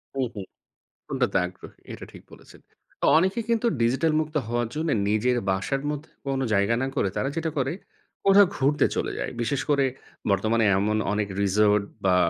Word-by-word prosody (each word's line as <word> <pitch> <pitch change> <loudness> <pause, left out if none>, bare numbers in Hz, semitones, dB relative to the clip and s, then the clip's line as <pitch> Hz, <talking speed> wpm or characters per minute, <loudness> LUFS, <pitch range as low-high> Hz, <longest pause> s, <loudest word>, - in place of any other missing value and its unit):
হুম, 135 - +1
হুম। 100 -2 -6 0.6
কোনটাতে - - 0
আগ্রহী 90 +1 -11
এটা - - -8
ঠিক - - -13
বলেছেন। - - -15 0.4
অ - - +4
অনেকে 190 +7 +2
কিন্তু 230 +1 +2
ডিজিটাল 135 +7 +2
মুক্ত 155 0 -3
হওয়ার 120 0 -1
জন্য 160 +1 -1 0.2
নিজের 120 +4 +2
বাসার 95 +9 -1
মধ্যে 150 +1 -6 0.2
কোনো 135 -1 -1
জায়গা 100 +3 +2
না 135 - 0
করে 95 - +1
তারা 135 - 0
যেটা 165 -1 -2
করে 135 +1 0 0.5
কোথাও 195 -1 +7
ঘুরতে 145 +2 +2
চলে - - -1
যায়। - - -3
বিশেষ 130 +4 -1
করে 140 -2 +3 0.5
বর্তমানে 110 +3 +2
এমন 105 +2 +1 0.2
অনেক 105 -1 0
রিসোর্ট 105 +1 +3 0.2
বা 90 -1 +4
130 Hz, 170 wpm, -25 LUFS, 105-150 Hz, 0.6 s, কোথাও